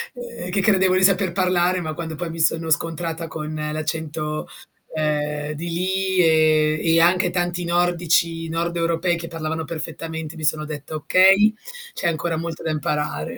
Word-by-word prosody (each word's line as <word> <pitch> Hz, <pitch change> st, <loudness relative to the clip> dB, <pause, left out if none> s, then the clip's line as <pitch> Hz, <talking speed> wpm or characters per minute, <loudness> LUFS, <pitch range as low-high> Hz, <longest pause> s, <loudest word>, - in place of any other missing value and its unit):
Ehm, 235 Hz, -7 st, -7 dB
che 195 Hz, -, +1 dB
credevo 190 Hz, -3 st, +3 dB
di 190 Hz, -, +2 dB
saper 190 Hz, -2 st, +3 dB
parlare, 180 Hz, -1 st, +1 dB
ma 155 Hz, -1 st, -4 dB
quando 165 Hz, -2 st, -5 dB
poi 170 Hz, +2 st, -4 dB
mi 165 Hz, 0 st, -7 dB
sono 160 Hz, 0 st, +1 dB
scontrata 165 Hz, +1 st, -1 dB
con 155 Hz, -1 st, -6 dB
l'accento, 155 Hz, 0 st, -3 dB, 0.5 s
ehm, 150 Hz, -1 st, -1 dB
di 170 Hz, +3 st, -5 dB
lì 190 Hz, +2 st, -1 dB
e 155 Hz, -2 st, +4 dB
e 165 Hz, 0 st, +4 dB
anche 175 Hz, +2 st, +4 dB
tanti 175 Hz, 0 st, -1 dB
nordici, 170 Hz, -1 st, +1 dB
nord-europei, 170 Hz, +1 st, 0 dB
che 170 Hz, 0 st, -7 dB
parlavano 160 Hz, -1 st, -4 dB
perfettamente, 160 Hz, 0 st, -6 dB
mi 160 Hz, -, -8 dB
sono 155 Hz, 0 st, +1 dB
detta: 150 Hz, 0 st, -7 dB
"Okay, 195 Hz, +7 st, +5 dB, 0.4 s
c'è -, -, -2 dB
ancora 165 Hz, 0 st, -1 dB
molto 165 Hz, -1 st, -5 dB
da 160 Hz, -, -2 dB
imparare." 150 Hz, -, -2 dB
165 Hz, 155 wpm, -22 LUFS, 155-175 Hz, 0.5 s, Okay